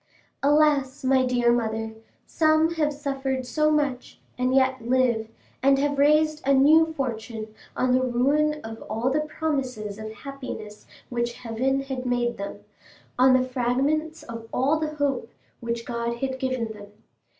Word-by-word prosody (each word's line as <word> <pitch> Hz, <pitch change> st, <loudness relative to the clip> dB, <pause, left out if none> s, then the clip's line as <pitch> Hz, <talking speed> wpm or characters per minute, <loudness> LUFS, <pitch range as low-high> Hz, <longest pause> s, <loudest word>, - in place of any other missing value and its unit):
Alas, 290 Hz, -2 st, +3 dB
my 260 Hz, 0 st, +3 dB
dear 240 Hz, -1 st, +3 dB
mother, 225 Hz, -1 st, -2 dB, 0.3 s
some 315 Hz, +1 st, +3 dB
have 305 Hz, -2 st, +1 dB
suffered 270 Hz, -3 st, -3 dB
so 305 Hz, +5 st, +1 dB
much, 285 Hz, -5 st, -1 dB, 0.2 s
and 255 Hz, +1 st, +1 dB
yet 260 Hz, -1 st, +3 dB
live, 240 Hz, -2 st, +1 dB, 0.3 s
and 275 Hz, +1 st, +4 dB
have 285 Hz, 0 st, 0 dB
raised 305 Hz, +1 st, +3 dB
a 275 Hz, +1 st, +3 dB
new 315 Hz, +4 st, +5 dB
fortune 225 Hz, -4 st, -4 dB, 0.2 s
on 255 Hz, -, +2 dB
the 255 Hz, +1 st, +4 dB
ruin 280 Hz, +5 st, +1 dB
of 225 Hz, 0 st, -8 dB
all 240 Hz, +4 st, 0 dB
the 295 Hz, -, +2 dB
promises 265 Hz, -9 st, -3 dB
of 215 Hz, 0 st, -6 dB
happiness 220 Hz, -3 st, -8 dB, 0.2 s
which 240 Hz, -1 st, -1 dB
heaven 250 Hz, +4 st, -1 dB
had 265 Hz, -2 st, -4 dB
made 240 Hz, -1 st, 0 dB
them—on 255 Hz, +5 st, -1 dB
the 255 Hz, -, -1 dB
fragments 275 Hz, +6 st, 0 dB
of 230 Hz, -1 st, -8 dB
all 280 Hz, +5 st, +2 dB
the 305 Hz, -1 st, -3 dB
hope 280 Hz, -5 st, -1 dB, 0.3 s
which 235 Hz, 0 st, -4 dB
God 235 Hz, 0 st, -2 dB
had 260 Hz, +1 st, -3 dB
given 255 Hz, -4 st, -1 dB
them! 205 Hz, -1 st, -11 dB
260 Hz, 150 wpm, -25 LUFS, 235-285 Hz, 0.3 s, new